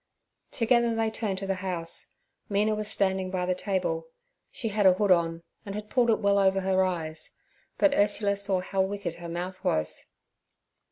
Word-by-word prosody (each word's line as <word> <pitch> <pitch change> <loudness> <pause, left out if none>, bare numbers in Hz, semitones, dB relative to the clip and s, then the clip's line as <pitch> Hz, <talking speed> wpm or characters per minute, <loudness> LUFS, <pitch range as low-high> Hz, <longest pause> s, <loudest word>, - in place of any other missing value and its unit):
Together 235 -1 +2
they 225 -1 0
turned 215 -4 -2
to 195 - -4
the 195 - 0
house. 175 -3 -3 0.4
Mina 210 +1 +2
was 215 0 -2
standing 190 -3 0
by 185 -1 -1
the 185 - +1
table; 180 -4 -2 0.4
she 225 - -4
had 205 -1 +3
a 185 - +7
hood 200 +1 +1
on, 165 -1 +2 0.2
and 200 -2 -6
had 210 0 -7
pulled 245 -2 +3
it 225 - +3
well 200 -1 +3
over 195 0 +3
her 190 0 +2
eyes, 160 -4 -3 0.5
but 295 -2 +4
Ursula 205 -3 +2
saw 200 -2 -1
how 190 +1 -1
wicked 190 -3 -2
her 170 -1 -7
mouth 180 +2 -5
was. 80 0 -1
195 Hz, 180 wpm, -27 LUFS, 180-210 Hz, 0.5 s, a